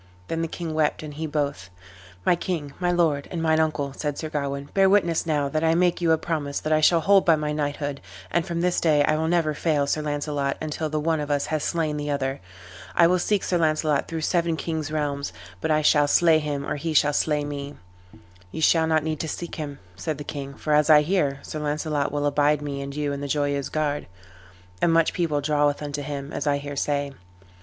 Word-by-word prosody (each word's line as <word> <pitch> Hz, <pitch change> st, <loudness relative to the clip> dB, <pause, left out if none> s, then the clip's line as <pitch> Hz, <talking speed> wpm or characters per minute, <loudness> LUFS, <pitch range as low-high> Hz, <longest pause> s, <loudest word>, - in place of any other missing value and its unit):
Then 165 Hz, 0 st, -1 dB
the 165 Hz, -, -1 dB
king 165 Hz, -1 st, -5 dB
wept 155 Hz, 0 st, 0 dB
and 150 Hz, -1 st, -7 dB
he 160 Hz, +2 st, -4 dB
both. 140 Hz, -, -2 dB, 0.6 s
"My -, -, +4 dB
king, 160 Hz, -5 st, -4 dB
my 180 Hz, -1 st, +1 dB
lord, 160 Hz, -5 st, +1 dB
and 175 Hz, -, -4 dB
mine 160 Hz, -1 st, +2 dB
uncle," 150 Hz, -3 st, 0 dB
said 145 Hz, 0 st, -3 dB
Sir 155 Hz, -, -4 dB
Gawain, 140 Hz, -1 st, -3 dB
"bear 195 Hz, -1 st, +4 dB
witness 175 Hz, -5 st, +2 dB
now 145 Hz, -3 st, +1 dB
that 155 Hz, +3 st, -1 dB
I 160 Hz, 0 st, +3 dB
make 175 Hz, 0 st, +2 dB
you 170 Hz, -1 st, +3 dB
a 160 Hz, -, +5 dB
promise 155 Hz, -4 st, -2 dB
that 155 Hz, -, -1 dB
I 155 Hz, -, +3 dB
shall 165 Hz, +2 st, +5 dB
hold 195 Hz, +4 st, +5 dB
by 165 Hz, -, +5 dB
my 150 Hz, -1 st, -2 dB
knighthood, 145 Hz, -1 st, -3 dB, 0.3 s
and 170 Hz, -, +2 dB
from 170 Hz, 0 st, -3 dB
this 180 Hz, 0 st, +1 dB
day 150 Hz, -3 st, +4 dB
I 155 Hz, -, +2 dB
will 160 Hz, +1 st, 0 dB
never 165 Hz, -2 st, +2 dB
fail 150 Hz, -2 st, +1 dB
Sir 155 Hz, +2 st, 0 dB
Launcelot 145 Hz, -1 st, -2 dB
until 155 Hz, 0 st, -3 dB
the 155 Hz, 0 st, -1 dB
one 160 Hz, +1 st, 0 dB
of 150 Hz, 0 st, -4 dB
us 145 Hz, -1 st, +1 dB
have 155 Hz, -1 st, -2 dB
slain 155 Hz, -2 st, -1 dB
the 145 Hz, 0 st, -3 dB
other. 135 Hz, -1 st, -2 dB, 0.5 s
I 170 Hz, -, +6 dB
will 180 Hz, +2 st, +3 dB
seek 205 Hz, +2 st, +1 dB
Sir 175 Hz, -, 0 dB
Launcelot 155 Hz, -2 st, +1 dB
throughout 165 Hz, -2 st, -4 dB
seven 170 Hz, -2 st, +1 dB
kings' 160 Hz, -1 st, -3 dB
realms, 140 Hz, -7 st, -2 dB, 0.3 s
but -, -, -1 dB
I 155 Hz, 0 st, +2 dB
shall 150 Hz, -1 st, +4 dB
slay 160 Hz, +1 st, +5 dB
him 145 Hz, -2 st, -3 dB
or -, -, -2 dB
he 155 Hz, +2 st, -3 dB
shall 145 Hz, 0 st, +4 dB
slay 150 Hz, 0 st, +1 dB
me." 145 Hz, 0 st, -6 dB, 0.8 s
"Ye -, -, -6 dB
shall 160 Hz, +1 st, +4 dB
not 160 Hz, -1 st, +2 dB
need 155 Hz, -1 st, -2 dB
to 160 Hz, -, -3 dB
seek 170 Hz, +2 st, -5 dB
him," 145 Hz, -3 st, -5 dB, 0.2 s
said 155 Hz, -, -3 dB
the 145 Hz, -, -6 dB
king, 140 Hz, -2 st, -6 dB
"for 150 Hz, -, -1 dB
as 150 Hz, +1 st, +4 dB
I 150 Hz, -1 st, +7 dB
hear, 145 Hz, -6 st, 0 dB
Sir 155 Hz, -, -6 dB
Launcelot 150 Hz, -1 st, -1 dB
will 145 Hz, 0 st, -1 dB
abide 145 Hz, 0 st, +2 dB
me 140 Hz, -1 st, -4 dB
and 140 Hz, 0 st, -6 dB
you 145 Hz, -1 st, -1 dB
in 140 Hz, -, -5 dB
the 145 Hz, -, -3 dB
Joyeuse 145 Hz, -1 st, 0 dB
Garde; 150 Hz, -2 st, -1 dB, 0.7 s
and 170 Hz, -, +4 dB
much 165 Hz, 0 st, +3 dB
people 155 Hz, -5 st, 0 dB
draweth 145 Hz, 0 st, +1 dB
unto 145 Hz, 0 st, -4 dB
him, 140 Hz, 0 st, -5 dB
as 145 Hz, -, -3 dB
I 145 Hz, -1 st, +3 dB
hear 145 Hz, 0 st, -6 dB
say." 140 Hz, 0 st, -1 dB
150 Hz, 230 wpm, -24 LUFS, 145-160 Hz, 0.8 s, I